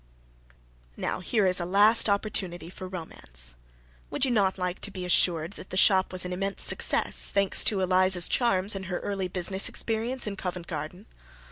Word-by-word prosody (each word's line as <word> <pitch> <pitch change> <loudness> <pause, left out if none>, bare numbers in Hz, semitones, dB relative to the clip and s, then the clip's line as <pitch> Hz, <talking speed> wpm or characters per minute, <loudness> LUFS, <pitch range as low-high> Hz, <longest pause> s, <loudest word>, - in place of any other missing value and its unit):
Now - - -2
here 205 +3 0
is 185 0 +1
a - - -2
last 205 +5 +4
opportunity 190 -4 -1
for 185 - -8
romance. 60 - -5 0.6
Would - - 0
you 260 - -1
not 200 -5 +2
like 180 -1 -3
to - - -3
be 185 -2 -6
assured 170 -1 +2
that 195 - -12
the 185 - -4
shop 190 -1 +4
was 185 -1 -6
an 180 - -3
immense 195 +2 -1
success, - - +1
thanks 200 -1 +3
to 200 -3 +2
Eliza's 185 -1 +3
charms 205 -4 +1
and 190 -1 -6
her 180 -2 -2
early 195 -2 -3
business 185 +2 0
experience 230 +3 -1
in 205 -2 -4
Covent 180 -2 -5
Garden? 165 +5 -6
185 Hz, 175 wpm, -27 LUFS, 180-200 Hz, 0.6 s, last